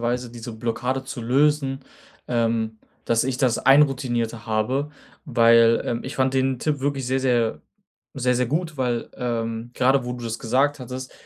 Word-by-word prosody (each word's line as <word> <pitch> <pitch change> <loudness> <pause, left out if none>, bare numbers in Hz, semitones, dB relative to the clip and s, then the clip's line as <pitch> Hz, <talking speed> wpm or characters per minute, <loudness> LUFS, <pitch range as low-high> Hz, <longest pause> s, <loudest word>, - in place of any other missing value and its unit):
Weise 120 0 -2
diese 120 -1 -8
Blockade 120 +4 -2
zu 130 -2 -6
lösen, 135 +2 +1 0.5
ähm, 115 -2 0 0.3
dass 115 0 +2
ich 130 -1 -1
das 125 -4 +1
einroutinierter 125 -5 +2
habe. 125 +7 -1 0.3
Weil, 115 -2 +5
ähm, 120 -1 -2
ich 130 - -6
fand 130 0 +1
den 130 -1 +1
Tipp 150 -2 0
wirklich 135 -2 -1
sehr, 130 +1 0
sehr 120 -3 +1 0.6
sehr, 125 0 +2
sehr 125 0 +1
gut, 155 +1 -2
weil, 120 -2 -1
ähm, 115 -1 -3
grade 130 0 +2
wo 125 - -3
du 120 -1 -8
das 115 -1 -3
gesagt 135 +5 +1
hattest, 130 +1 -7
125 Hz, 165 wpm, -23 LUFS, 115-135 Hz, 0.6 s, Weil